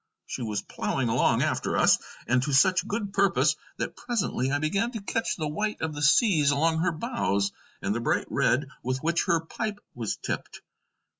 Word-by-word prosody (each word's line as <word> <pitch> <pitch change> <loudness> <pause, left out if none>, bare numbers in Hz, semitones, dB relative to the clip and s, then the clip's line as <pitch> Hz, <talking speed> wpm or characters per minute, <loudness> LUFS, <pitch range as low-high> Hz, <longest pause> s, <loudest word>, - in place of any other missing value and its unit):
She - - -5
was 105 -3 -2
ploughing 130 -3 -2
along 115 - +3
after - - 0
us, - - +5 0.3
and 125 0 +2
to 140 +2 -2
such 185 +7 +4
good 205 -1 -3
purpose 200 -1 +3 0.2
that - - -3
presently 190 - -1
I 145 - +1
began 195 +10 0
to 225 - -3
catch 225 +3 -1
the 155 -3 -3
white 210 +8 -2
of 160 -1 -2
the 145 - -6
seas 150 - +4
along 160 +3 +2
her 175 +2 +2
bows, 155 - -1 0.3
and 100 - 0
the 115 - -2
bright 115 - 0
red 135 +4 +2
with 130 +2 -2
which 170 +1 +1
her 170 -4 +2
pipe 205 +5 -4
was 115 -4 -3
tipped. - - -5
155 Hz, 190 wpm, -27 LUFS, 130-200 Hz, 0.3 s, us